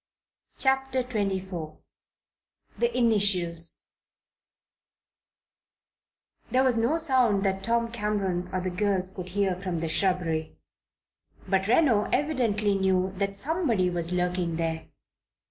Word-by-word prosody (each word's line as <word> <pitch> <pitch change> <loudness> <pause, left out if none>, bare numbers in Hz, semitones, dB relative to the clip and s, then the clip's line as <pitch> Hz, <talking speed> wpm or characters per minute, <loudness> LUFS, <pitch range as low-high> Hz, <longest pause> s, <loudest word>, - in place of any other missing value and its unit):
CHAPTER 265 -1 +1
XXIV 190 -8 -3 1.0
THE 475 0 0
INITIALS 190 -8 +1 2.7
There 255 +1 +3
was 255 -2 +2
no 235 +8 +1
sound 255 -10 +3
that 195 -1 0
Tom 230 +2 0
Cameron 200 -5 -2
or 185 - -2
the 185 0 -3
girls 190 -1 0
could 185 -2 -7
hear 195 0 0
from 185 -3 -3
the 165 0 -2
shrubbery; 165 - 0 0.9
but 190 0 +1
Reno 235 -4 +3
evidently 235 -8 0
knew 190 -1 +1
that 200 0 -1
somebody 245 - 0
was 170 -1 -3
lurking 180 -1 -1
there. 160 -1 -3
195 Hz, 110 wpm, -27 LUFS, 180-235 Hz, 2.7 s, There